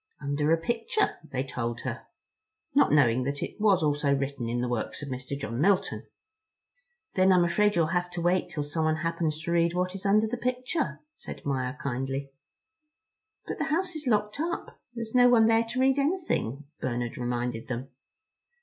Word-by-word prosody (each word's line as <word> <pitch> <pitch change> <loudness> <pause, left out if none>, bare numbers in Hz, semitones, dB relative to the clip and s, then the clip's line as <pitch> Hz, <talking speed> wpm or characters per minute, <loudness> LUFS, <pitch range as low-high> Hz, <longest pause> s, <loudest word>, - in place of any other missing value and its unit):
"Under 145 +2 0
a 165 - +5
picture" 235 - -1
they 130 0 -1
told 120 -3 -4
her, - - -5 0.7
not 280 - +4
knowing 130 -5 +4
that 140 +1 -2
it - - -6
was 200 -6 +4
also 145 -1 +2
written 135 -3 -3
in 120 +1 -1
the 125 - 0
works 120 +4 -3
of 145 - -6
Mr. 130 +2 -4
John 115 -1 -3
Milton. 195 +2 +1 1.1
"Then 185 0 +4
I'm 180 -1 +5
afraid 205 +4 +2
you'll 170 -2 +4
have 175 0 0
to 175 - -3
wait 180 +2 +1
'til 150 - -3
someone 155 +1 0
happens 165 -2 -1
to 170 - -2
read 170 0 +2
what 180 +1 0
is 195 0 -7
under 215 +2 +4
the 235 +3 -3
picture," 255 +5 -2 0.2
said - - -9
Maia 130 -2 -1
kindly. 135 0 -3 1.1
"But - - -5
the - - 0
house 360 +3 0
is 305 -3 -5
locked 210 +1 +1
up; 335 +3 -4
there's 230 -2 -5
no 245 -1 +6
one 230 -2 +6
there 225 +1 +4
to 235 +3 -3
read 265 +1 +3
anything," 280 - -1 0.2
Bernard 120 -1 -2
reminded 120 -1 -3
them. 130 +2 -4
165 Hz, 180 wpm, -28 LUFS, 135-220 Hz, 1.1 s, no